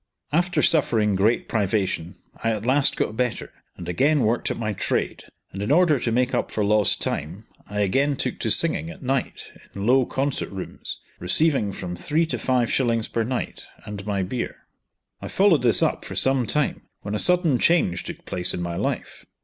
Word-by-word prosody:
After 175 0 +1
suffering 115 -9 +3
great 105 +5 +1
privation, 95 -5 -1 0.3
I 115 0 +1
at 110 0 -5
last 135 +3 +3
got 110 - -1
better, 125 0 -2 0.2
and 85 - -8
again 140 - +2
worked 115 +2 0
at - - -3
my 110 -2 -2
trade, - - -2 0.3
and 95 - -6
in 105 - -1
order 160 -3 +4
to 120 - -1
make 125 +2 +1
up 120 - 0
for 105 - -1
lost 105 -1 +3
time, 85 +9 -4 0.2
I 105 +1 -2
again 135 +9 +1
took - - -3
to - - -1
singing 80 +2 +2
at 85 - -11
night 135 0 -3 0.2
in 100 0 -4
low 130 +1 +4
concert 135 0 -2
rooms, 95 -1 -6 0.2
receiving 110 - +2
from 90 -2 -6
three 155 - 0
to 160 - -3
five 125 -3 +1
shillings 115 -4 +2
per 115 - -1
night, 125 +2 -4 0.2
and 105 -1 -7
my 100 -2 0
beer. 115 +6 -5 0.6
I - - -6
followed 190 -5 +3
this 120 -3 +4
up - - 0
for - - -7
some 130 -3 +2
time, 150 -1 0 0.2
when 100 - -5
a 105 - -1
sudden 175 -8 +3
change 125 - +2
took - - -9
place 90 0 0
in 90 - -4
my 85 0 -4
life. - - -4
115 Hz, 190 wpm, -23 LUFS, 100-135 Hz, 0.6 s, order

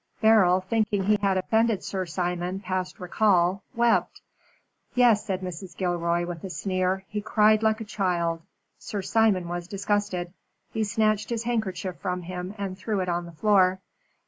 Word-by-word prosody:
Beryl, 200 -5 +5
thinking 205 0 0
he 210 +2 +3
had 195 -2 +2
offended 220 +1 +1
Sir 190 -2 -3
Simon 175 +2 -2
past 185 -1 -3
recall, 185 0 +2
wept. 235 0 +2 0.7
Yes," 240 -4 +5
said 190 -2 -3
Mrs. 180 -1 -7
Gilroy, 175 -1 0
with 175 -2 -7
a 190 - -5
sneer, 185 0 -1
"he 210 0 -4
cried 215 0 +4
like 220 0 +1
a - - -5
child. 175 -5 -1 0.4
Sir 205 -2 -5
Simon 210 -5 +2
was 175 0 -4
disgusted. 200 -3 -2 0.4
He 220 - 0
snatched 215 0 +1
his 235 -1 -2
handkerchief 215 -6 -2
from 180 -2 -3
him, 180 +3 -6
and 195 -2 -4
threw 200 +2 -2
it 180 -1 -1
on 175 0 -2
the - - -10
floor. 190 0 +4
190 Hz, 160 wpm, -26 LUFS, 180-215 Hz, 0.7 s, Beryl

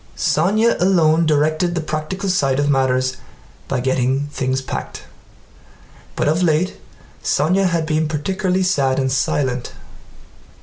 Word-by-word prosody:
Sónya 210 +9 +2
alone 165 -3 +3
directed 155 +3 +1
the - - 0
practical 155 +5 -4
side 140 -9 +1
of 145 0 +2
matters 130 -1 +1 0.5
by 135 - -1
getting 130 +2 0
things 130 -2 -1
packed. 135 - -6 1.1
But - - 0
of 160 +4 +1
late 170 +1 +1 0.4
Sónya 185 +6 +2
had 170 -2 0
been 155 0 0
particularly 185 +5 -1
sad 140 -8 +1
and 130 -1 0
silent. 130 -2 -1
155 Hz, 125 wpm, -19 LUFS, 135-180 Hz, 1.1 s, alone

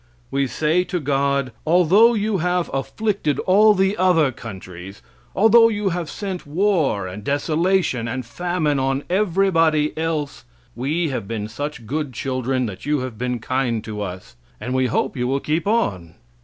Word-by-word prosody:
We 140 0 +1
say 155 +8 +1
to 180 - -2
God, 140 -2 0
"Although 180 +8 +5
You 210 -2 0
have 180 +1 0
afflicted 185 +3 -1
all 210 +3 +5
the 195 +1 +2
other 170 -7 +3
countries, 95 -5 -10 0.3
although 225 +3 +6
You 205 -2 -1
have 170 -3 -3
sent 190 -4 -5
war, 155 - +1
and 95 +3 -7
desolation, 155 - 0
and 130 +1 -4
famine 155 +2 -1
on 135 +1 0
everybody 165 -6 +2
else, 155 - -3 0.3
we 150 +7 -1
have 130 -7 -4
been 105 -1 -4
such 130 +2 -6
good 145 +2 -3
children 130 +1 -1
that 100 -5 -7
you 145 -2 0
have 125 -4 -6
been 125 0 -1
kind 120 -1 -1
to 105 -1 -6
us, 95 -7 -7 0.2
and 125 - -4
we 130 0 +2
hope 120 - -1
you 125 -1 -1
will 135 +2 0
keep 155 +6 -2
on." 95 - -1
145 Hz, 160 wpm, -21 LUFS, 125-180 Hz, 0.3 s, although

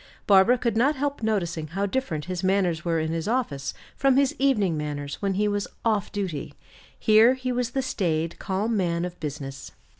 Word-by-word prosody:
Barbara 200 +5 +6
could 235 -2 -1
not 270 +7 +3
help 285 -1 -2
noticing 175 -8 -1
how 195 +6 -2
different 195 - -2
his 180 -1 -4
manners 185 -4 +1
were 165 -2 +1
in 160 0 -1
his 165 +1 -2
office 185 - -1 0.2
from 270 -1 +3
his 275 -1 +3
evening 215 -11 +2
manners 145 -2 -4
when 195 -2 0
he 210 +2 +2
was 205 -1 -1 0.2
"off 210 -3 +1
duty." 185 -8 -4 0.4
Here 220 +3 +5
he 255 -1 -3
was 250 -1 -1
the 265 - +1
staid, 170 -9 -1
calm 205 +4 -1
man 175 -3 0
of 180 0 -7
business. 140 -3 -6
195 Hz, 185 wpm, -25 LUFS, 165-235 Hz, 0.4 s, Barbara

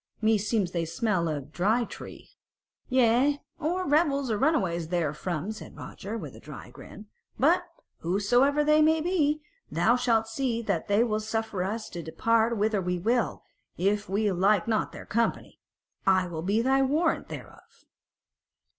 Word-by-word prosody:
meseems 215 -3 +1
they 170 -2 -1
smell 185 0 0
of 145 -3 -3
the - - -20
Dry 210 +9 +1
Tree." - - -10 0.6
"Yea, 255 +3 +3 0.2
or 350 +4 -1
rebels 280 -4 +2
and 210 - -1
runaways 185 - +1
therefrom," 170 +2 -2
said 220 - -10
Roger, 210 +4 -7
with - - -8
a - - -12
dry - - -10
grin. 210 - -12 0.3
"But 345 +6 +3 0.3
whosoever 245 - +2
they 305 +1 +4
may 315 +1 +4
be, 305 -3 +1 0.3
thou 235 - +3
shalt 230 -3 +1
see 235 0 -2
that 195 -7 -1
they 205 +3 +3
will 215 -3 0
suffer 220 -2 -3
us 215 +3 -3
to 175 - -5
depart 230 +8 +1
whither 210 -1 +1
we 180 0 -1
will, 230 +5 0 0.3
if 205 +3 0
we 205 +1 +1
like 190 +2 +2
not 220 -2 0
their - - -10
company. 230 +2 -1 0.5
I 185 -1 +4
will 165 -3 -5
be 205 +6 +1
thy 270 +1 +3
warrant 305 +5 +1
thereof." - - -12
220 Hz, 155 wpm, -27 LUFS, 190-265 Hz, 0.6 s, they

